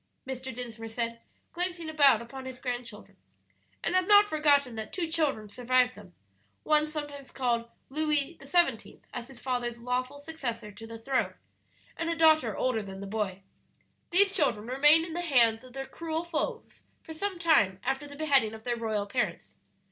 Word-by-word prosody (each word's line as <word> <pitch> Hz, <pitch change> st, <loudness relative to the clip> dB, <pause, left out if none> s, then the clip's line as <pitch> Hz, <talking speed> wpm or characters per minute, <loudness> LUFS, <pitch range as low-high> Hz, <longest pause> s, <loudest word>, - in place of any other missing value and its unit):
Mr. 260 Hz, 0 st, -5 dB
Dinsmore 230 Hz, -2 st, -6 dB
said, 230 Hz, 0 st, -3 dB, 0.3 s
glancing 350 Hz, -1 st, -2 dB
about 285 Hz, -7 st, +5 dB
upon 260 Hz, +3 st, -9 dB
his 260 Hz, -1 st, -7 dB
grandchildren; 245 Hz, -4 st, -6 dB, 0.7 s
"and -, -, -1 dB
have 370 Hz, 0 st, +2 dB
not 415 Hz, 0 st, +7 dB
forgotten 290 Hz, -, +3 dB
that 220 Hz, -1 st, -6 dB
two 350 Hz, -3 st, -2 dB
children 300 Hz, -10 st, 0 dB
survived 250 Hz, +3 st, +2 dB
them 200 Hz, -5 st, -15 dB, 0.5 s
one 305 Hz, 0 st, +3 dB
sometimes 290 Hz, -3 st, -6 dB
called 235 Hz, -3 st, -1 dB, 0.2 s
Louis 300 Hz, +1 st, 0 dB
XVII., 275 Hz, -5 st, 0 dB
as 245 Hz, -1 st, -5 dB
his 265 Hz, -2 st, -12 dB
father's 245 Hz, -2 st, -2 dB
lawful 250 Hz, +3 st, -2 dB
successor 245 Hz, -8 st, -5 dB
to 225 Hz, +3 st, -11 dB
the 225 Hz, 0 st, -8 dB
throne, 260 Hz, +3 st, -1 dB, 0.6 s
and 330 Hz, -, -2 dB
a 335 Hz, -, 0 dB
daughter 315 Hz, -9 st, +4 dB
older 250 Hz, -4 st, 0 dB
than 195 Hz, -1 st, -8 dB
the 200 Hz, -, -6 dB
boy. 195 Hz, -2 st, -3 dB, 0.7 s
"These 390 Hz, +3 st, +6 dB
children 255 Hz, -, +1 dB
remained 295 Hz, +6 st, +5 dB
in 330 Hz, -, -7 dB
the 350 Hz, -, -2 dB
hands 235 Hz, -8 st, +4 dB
of 255 Hz, -1 st, -14 dB
their 270 Hz, 0 st, -5 dB
cruel 325 Hz, +2 st, -4 dB
foes 345 Hz, +8 st, -4 dB, 0.2 s
for 320 Hz, -, -8 dB
some 390 Hz, +3 st, -3 dB
time 210 Hz, -, +3 dB
after 270 Hz, +3 st, -2 dB
the 285 Hz, -, -10 dB
beheading 275 Hz, -8 st, +2 dB
of 220 Hz, -, -12 dB
their 240 Hz, 0 st, -1 dB
royal 220 Hz, -3 st, -1 dB
parents. 245 Hz, +5 st, -2 dB
260 Hz, 170 wpm, -29 LUFS, 230-315 Hz, 0.7 s, not